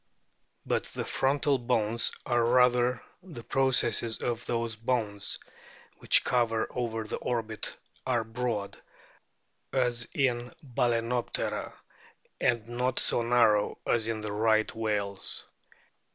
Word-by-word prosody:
But - - 0
the - - -5
frontal 140 0 +1
bones, 115 -2 +1
or 120 -1 +2
rather 125 +1 +3 0.2
the 165 -11 -10
processes 120 -4 +2
of 120 -1 -2
those 115 -1 -1
bones, 110 -3 -2 0.6
which - - +5
cover 115 -2 +1
over 115 -2 -2
the 110 - -4
orbit 110 -3 -2 0.3
are 120 -3 +1
broad, 115 -3 -3 0.9
as 120 -2 0
in 125 -3 0
Balcenoptera, 120 -2 -1 0.6
and 115 -2 +1
not 125 +2 -1
so - - +1
narrow 115 -3 +3
as 115 -2 +1
in 110 -1 -2
the 105 -1 -4
Right 110 +1 +2
whales. 105 -3 -2
120 Hz, 110 wpm, -29 LUFS, 110-125 Hz, 0.9 s, which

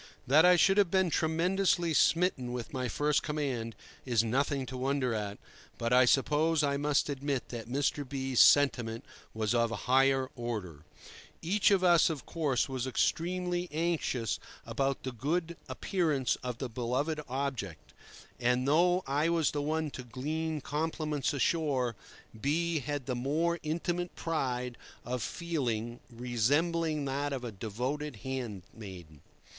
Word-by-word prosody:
That 150 +6 +6
I 180 - +7
should 195 +3 +4
have 200 -4 +4
been 190 -1 +2
tremendously 170 +2 +1
smitten 155 -6 +2
with 125 +5 -5
my 130 -2 -1
first 145 +5 +1
command 135 -7 -3 0.3
is 120 -4 +2
nothing 135 +4 0
to 130 - -7
wonder 130 -1 0
at, 105 -2 -3 0.4
but 115 +1 -1
I 125 0 +7
suppose 150 +5 +3
I 140 -1 +1
must 145 0 +1
admit 140 -2 -2
that 115 -2 -6
Mr. 145 +2 0
B—'s 135 -3 -1
sentiment 120 -5 +4 0.3
was 110 0 0
of 115 -1 +2
a 115 - -3
higher 135 0 +3
order. 105 - -5 0.6
Each 195 +5 +3
of 195 -2 +3
us, 175 -2 +5
of 150 -5 -5
course, 150 -7 0
was 130 -2 -3
extremely 175 +5 0
anxious 155 - -1 0.3
about 135 -1 -1
the 130 - -3
good 165 +8 -2
appearance 155 - 0
of 125 -2 -4
the 130 - -3
beloved 130 +7 -2
object; 130 - -4 0.5
and, 125 +1 +1
though 175 +5 +3
I 145 +4 +1
was 165 -2 +2
the 145 - -2
one 155 +1 -1
to 130 - -7
glean 150 +6 -3
compliments 150 -1 -1
ashore, 140 -5 0 0.5
B— 165 +3 +1
had 145 -1 -4
the 130 - -2
more 155 +7 0
intimate 175 +3 -2
pride 125 -6 -2 0.3
of 125 0 -3
feeling, 120 -7 -2
resembling 145 +7 0
that 140 +1 -2
of 135 -3 -3
a 120 - -4
devoted 125 +8 -4
handmaiden. 100 - -7
140 Hz, 145 wpm, -31 LUFS, 125-160 Hz, 0.6 s, I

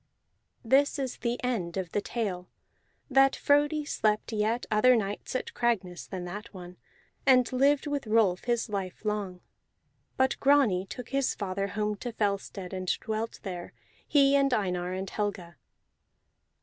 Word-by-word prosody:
This 275 +6 +3
is 265 -3 -3
the 235 0 -2
end 195 -9 -2
of 180 -3 -3
the 205 - 0
tale, 195 -6 -3 0.6
that 270 -1 +4
Frodi 295 +1 +2
slept 215 -4 0
yet 220 +3 0
other 245 +4 +5
nights 205 +2 -3
at 255 - -3
Cragness 195 -7 -1
than 185 -2 -5
that 205 +5 -7
one, 180 -1 -10 0.5
and 255 -1 +4
lived 275 +2 +3
with 290 -4 -3
Rolf 215 -5 +2
his 240 -1 0
life 200 -1 -5
long. 200 -4 -2 0.8
But 260 0 +2
Grani 250 -10 +3
took 250 +4 -8
his 275 -1 0
father 195 -1 -2
home 210 +1 -2
to 240 +4 -5
Fellstead, 200 -3 -2
and 185 -1 -4
dwelt 220 +1 -4
there, 180 -3 -6 0.3
he 280 -1 +5
and 275 -1 +3
Einar 180 -4 -1
and 190 +1 -3
Helga. 185 -6 -4
215 Hz, 150 wpm, -28 LUFS, 190-255 Hz, 0.8 s, other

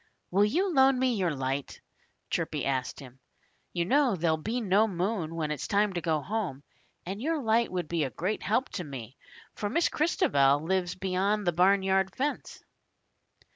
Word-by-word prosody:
"Will 200 +3 +4
you 355 - 0
loan 265 -1 +5
me 255 -1 +2
your 190 -5 0
light?" 135 +1 -3 0.5
Chirpy - - -1
asked 130 -2 -2
him. 130 -1 -12 0.5
"You 170 -1 -1
know 265 +1 +3
there'll 165 -2 +1
be 220 +10 -3
no 210 0 +3
moon 180 -3 -2
when 155 -2 -2
it's 150 - -4
time 205 0 +2
to 175 - -2
go 155 -2 0
home. 185 -10 -3 0.4
And 195 +4 -5
your 320 +3 0
light 230 -2 +1
would 180 -3 -3
be 165 0 0
a 135 - -1
great 185 - -3
help 235 +6 0
to 180 - -5
me, 130 -5 -8 0.4
for 205 - -3
Miss 335 +10 +2
Christabel 140 - +2
lives 180 +1 -1
beyond 195 +2 0
the 175 - +2
barnyard 190 +2 +2
fence." 290 +3 -3
190 Hz, 175 wpm, -28 LUFS, 160-220 Hz, 0.5 s, loan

